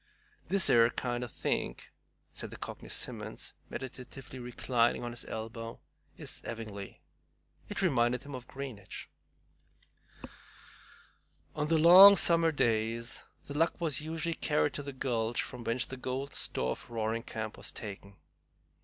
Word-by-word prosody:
"This 190 0 +2
'ere 115 0 +6
kind 120 0 -2
o' - - -3
think," - - -2 0.4
said - - -5
the - - -9
Cockney - - -7
Simmons, - - -4 0.2
meditatively 130 0 -7
reclining 120 -1 +1
on 120 - -3
his 120 - -5
elbow, 115 +1 -6 0.4
"is - - -5
'evingly." 105 -4 -7 0.7
It 190 - -2
reminded 125 -7 +2
him 145 - -9
of 125 -1 -7
Greenwich. 130 -9 -7 2.4
On 150 0 -1
the 165 +1 +3
long 185 +5 +11
summer 165 -3 +5
days 115 -3 0 0.2
The 145 - -7
Luck 165 +3 +2
was 155 -5 0
usually 165 +2 -2
carried 150 -2 +1
to - - -4
the 140 0 -6
gulch 120 -3 0
from 125 -2 -8
whence 115 +1 0
the 130 - -7
golden 130 +2 -3
store 65 0 -1
of - - -7
Roaring 115 0 -1
Camp 110 -1 -5
was 100 - -6
taken. 100 -2 -8
125 Hz, 140 wpm, -32 LUFS, 115-145 Hz, 2.4 s, long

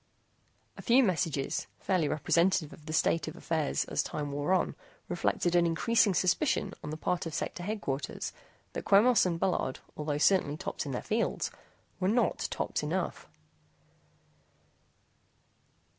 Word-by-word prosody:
A - - -7
few 255 +3 +5
messages, 165 - 0
fairly 185 -5 +1
representative 170 +2 +2
of 155 - -15
the - - -4
state 160 0 +2
of 155 - -6
affairs 160 -3 -1
as - - 0
time 145 -1 -4
wore 145 +4 -1
on 190 - +2 0.3
reflected 175 - 0
an 170 -1 +5
increasing 200 +4 +3
suspicion 195 - +1
on - - -5
the 155 - -4
part 175 +1 -1
of 160 - -5
Sector - - -3
Headquarters 175 -9 -3 0.4
that - - -4
Quemos 215 +1 +5
and 170 -2 -1
Bullard, 170 -8 0 0.2
although 150 -1 -2
certainly 155 -2 +3
tops 150 - -4
in - - -3
their 125 - -3
fields, 225 +2 -1 0.5
were 185 - +1
not 235 +4 +1
tops - - -2
enough. - - -3
170 Hz, 145 wpm, -30 LUFS, 150-195 Hz, 0.5 s, few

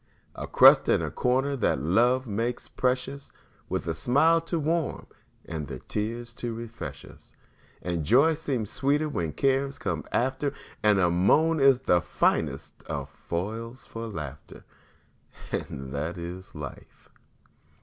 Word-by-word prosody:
A - - -6
crust - - +7
and - - +3
a - - -3
corner 130 +3 +1
that 110 - +1
love 120 - +3
makes 115 +3 -2
precious, 130 +2 -2 0.4
With - - -2
a 80 - 0
smile 150 - +3
to 165 +1 -2
warm 160 0 -1 0.4
and 80 -3 -5
the - - -6
tears 115 +3 -4
to 120 -2 -3
refresh 115 0 -7
us; - - -17 0.5
And 85 -3 -2
joy 135 - +5
seems 135 -9 -3
sweeter 145 +3 +1
when 85 - -2
cares 135 - +1
come 85 -6 -2
after, 135 +3 0 0.3
And 105 -1 +4
a 90 -2 +3
moan 150 - +3
is 135 -2 +5
the 90 -9 +3
finest - - 0
of - - -4
foils 110 +8 -5
for 115 0 -6
laughter; 75 -8 -8 0.9
And 65 0 -4
that 80 +5 -3
is 90 +3 -7
life! 75 -3 -9
115 Hz, 140 wpm, -27 LUFS, 90-135 Hz, 0.9 s, crust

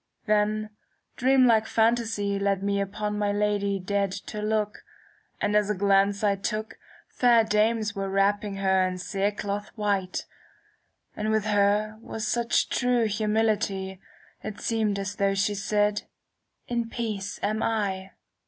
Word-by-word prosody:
Then 215 0 +1 0.4
dream 260 0 +4
like 225 -2 +4
phantasy 220 -3 +1
^ - - -7
Led 195 -1 +1
me 200 0 +1
upon 210 +1 -3
my 205 -1 +1
lady 205 -1 0
dead 200 +1 -1
to 210 +2 -6
look, 210 -1 -1 0.6
And 210 - 0
as 210 -1 +3
a 210 - +1
glance 200 +1 +2
I 200 -1 +2
took, 215 +2 -4 0.3
Fair 240 -2 +4
dames 215 0 +1
were 195 -1 -2
wrapping 200 +1 +1
her 190 -1 +2
in 185 0 -4
cere 195 +2 -1
cloth 205 0 -4
white; 200 -4 -1 0.9
And 215 0 -2
with 220 -1 +1
her 210 +1 +2
was 225 -2 -5
such 235 +2 +1
true 245 -2 +2
humility, 210 -3 0 0.4
It 215 -1 -6
seemed 220 -3 0
as 200 +1 -4
though 195 0 +2
she 200 +1 +1
said, 205 +1 +1 0.3
' - - -50
In 235 -1 -2
peace 215 -4 -4
am 215 +2 0
I.' 195 -4 -1
210 Hz, 150 wpm, -26 LUFS, 200-220 Hz, 0.9 s, dream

